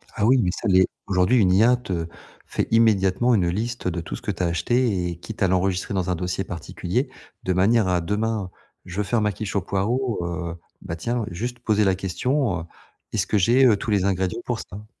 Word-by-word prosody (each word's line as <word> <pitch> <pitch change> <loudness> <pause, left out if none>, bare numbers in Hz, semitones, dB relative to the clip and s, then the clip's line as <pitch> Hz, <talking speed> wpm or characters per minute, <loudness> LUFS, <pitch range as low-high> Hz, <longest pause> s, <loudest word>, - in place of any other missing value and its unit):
Ah 105 - +1
oui 130 +3 +5
mais 90 - +1
ça 105 - -4
l'est. 95 -1 +5 0.2
Aujourd'hui, 95 +5 +3
une 90 -4 +4
IA 115 +6 +5
te 90 -9 -4 0.4
fait - - -2
immédiatement 110 0 +3
une 90 -5 +2
liste, 115 +3 -3
heu, - - +1
de 85 0 -3
tout - - -6
ce - - -9
que - - -2
tu - - -3
as - - +2
acheté 95 +3 +1
et 85 - -6
quitte 110 +5 -9
à - - +4
l'enregistrer 95 +1 0
dans 95 -1 -1
un 90 - +1
dossier 90 +2 -2
particulier, 85 -4 -3 0.3
de 95 - 0
manière 100 +3 +3
à, 90 -1 +1
demain, 105 +2 -1 0.4
je 90 0 -8
veux 105 - +1
faire 115 +2 0
ma 105 0 +1
quiche 100 +2 -5
aux 100 - +2
poireaux, 110 +7 -1
heu 85 0 -4 0.3
bah, 80 - -5
tiens, 115 +7 -2
juste 120 +8 -4
poser 110 -3 +2
la 95 -1 +3
question: 100 - -1
«heu, - - -7 0.5
est-ce - - 0
que 105 - +1
j'ai, 120 +8 +5
heu, 110 -5 +5
tous 110 - -4
les 100 -3 +2
ingrédients 95 +3 0
pour 120 -3 -2
ça?». 105 +3 -9
100 Hz, 230 wpm, -23 LUFS, 90-115 Hz, 0.5 s, oui